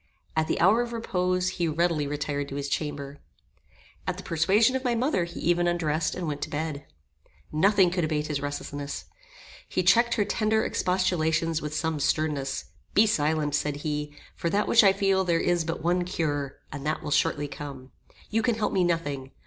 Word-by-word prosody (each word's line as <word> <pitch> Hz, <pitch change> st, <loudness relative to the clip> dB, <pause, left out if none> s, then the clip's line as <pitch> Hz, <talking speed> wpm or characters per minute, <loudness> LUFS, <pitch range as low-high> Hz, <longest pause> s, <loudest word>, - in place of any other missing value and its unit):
At 160 Hz, 0 st, +1 dB
the -, -, -1 dB
hour 200 Hz, +7 st, +5 dB
of 240 Hz, -1 st, -4 dB
repose 185 Hz, -5 st, 0 dB
he 175 Hz, -2 st, -1 dB
readily 160 Hz, -2 st, +1 dB
retired 145 Hz, -1 st, -3 dB
to 140 Hz, -, -6 dB
his 140 Hz, 0 st, -3 dB
chamber. 145 Hz, -1 st, -3 dB, 0.9 s
At -, -, -1 dB
the -, -, -8 dB
persuasion 200 Hz, +10 st, +3 dB
of 260 Hz, -, -1 dB
my 245 Hz, -2 st, +1 dB
mother 235 Hz, -, +1 dB
he 170 Hz, 0 st, -8 dB
even 175 Hz, +1 st, +2 dB
undressed 160 Hz, -2 st, 0 dB
and 180 Hz, -, -4 dB
went 145 Hz, -1 st, -3 dB
to -, -, -3 dB
bed. 150 Hz, -1 st, -4 dB, 0.6 s
Nothing 190 Hz, +3 st, +4 dB
could 180 Hz, -1 st, 0 dB
abate 155 Hz, -1 st, 0 dB
his 150 Hz, -2 st, -2 dB
restlessness. 145 Hz, 0 st, -5 dB, 0.6 s
He 185 Hz, -, 0 dB
checked 235 Hz, +6 st, +4 dB
her 205 Hz, -, +1 dB
tender 220 Hz, +1 st, +1 dB
expostulations 165 Hz, -3 st, +1 dB
with 150 Hz, 0 st, -4 dB
some 160 Hz, -1 st, -1 dB
sternness. 140 Hz, -2 st, 0 dB, 0.3 s
"Be 215 Hz, -, +7 dB
silent," 155 Hz, -7 st, +1 dB
said 150 Hz, 0 st, 0 dB
he, 150 Hz, -1 st, -2 dB, 0.2 s
"for 170 Hz, -, -2 dB
that 205 Hz, +4 st, +1 dB
which 235 Hz, -, +6 dB
I 195 Hz, -, +7 dB
feel 195 Hz, -1 st, +2 dB
there 170 Hz, -2 st, +2 dB
is 175 Hz, -1 st, +1 dB
but 165 Hz, -1 st, -4 dB
one 175 Hz, +1 st, +2 dB
cure, 145 Hz, -6 st, -2 dB
and 145 Hz, -2 st, -6 dB
that 155 Hz, +1 st, -2 dB
will 150 Hz, -, -4 dB
shortly 145 Hz, 0 st, +1 dB
come. 135 Hz, -3 st, -8 dB, 0.4 s
You 225 Hz, +1 st, +2 dB
can 230 Hz, 0 st, +1 dB
help 215 Hz, -1 st, -1 dB
me 185 Hz, -, +3 dB
nothing. 145 Hz, -6 st, -1 dB
165 Hz, 190 wpm, -27 LUFS, 150-185 Hz, 0.9 s, Be